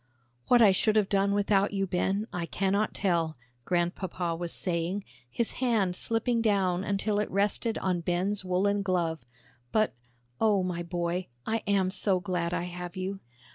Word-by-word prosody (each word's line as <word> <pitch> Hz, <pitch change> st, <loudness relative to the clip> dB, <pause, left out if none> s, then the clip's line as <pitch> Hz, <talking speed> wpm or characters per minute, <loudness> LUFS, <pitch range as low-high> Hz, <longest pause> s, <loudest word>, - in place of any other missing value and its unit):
"What 240 Hz, -1 st, +6 dB
I 205 Hz, -, +7 dB
should 215 Hz, +3 st, +2 dB
have 210 Hz, -3 st, +3 dB
done 200 Hz, 0 st, +2 dB
without 200 Hz, 0 st, +2 dB
you, 195 Hz, -1 st, 0 dB
Ben, 190 Hz, +3 st, 0 dB
I 175 Hz, -1 st, -3 dB
cannot 195 Hz, +4 st, 0 dB
tell," 170 Hz, -5 st, 0 dB, 0.3 s
Grandpapa 175 Hz, 0 st, -1 dB
was 170 Hz, 0 st, -4 dB
saying, 180 Hz, +2 st, -1 dB, 0.3 s
his 235 Hz, -, -1 dB
hand 215 Hz, -8 st, +2 dB
slipping 230 Hz, +3 st, 0 dB
down 195 Hz, -4 st, +2 dB
until 205 Hz, +1 st, 0 dB
it 210 Hz, -, -1 dB
rested 205 Hz, +3 st, 0 dB
on 185 Hz, -2 st, 0 dB
Ben's 185 Hz, +4 st, -1 dB
woollen 195 Hz, +3 st, +1 dB
glove, 170 Hz, -6 st, -1 dB, 0.5 s
"but, 215 Hz, -1 st, +2 dB, 0.5 s
oh, 205 Hz, -4 st, +3 dB
my 180 Hz, -2 st, -2 dB
boy, 175 Hz, +1 st, -2 dB, 0.2 s
I 225 Hz, -, +1 dB
am 195 Hz, -2 st, +2 dB
so 190 Hz, -1 st, +2 dB
glad 180 Hz, -3 st, -2 dB
I 175 Hz, -, -1 dB
have 180 Hz, +1 st, -6 dB
you." 190 Hz, +1 st, -3 dB
190 Hz, 160 wpm, -29 LUFS, 175-205 Hz, 0.5 s, I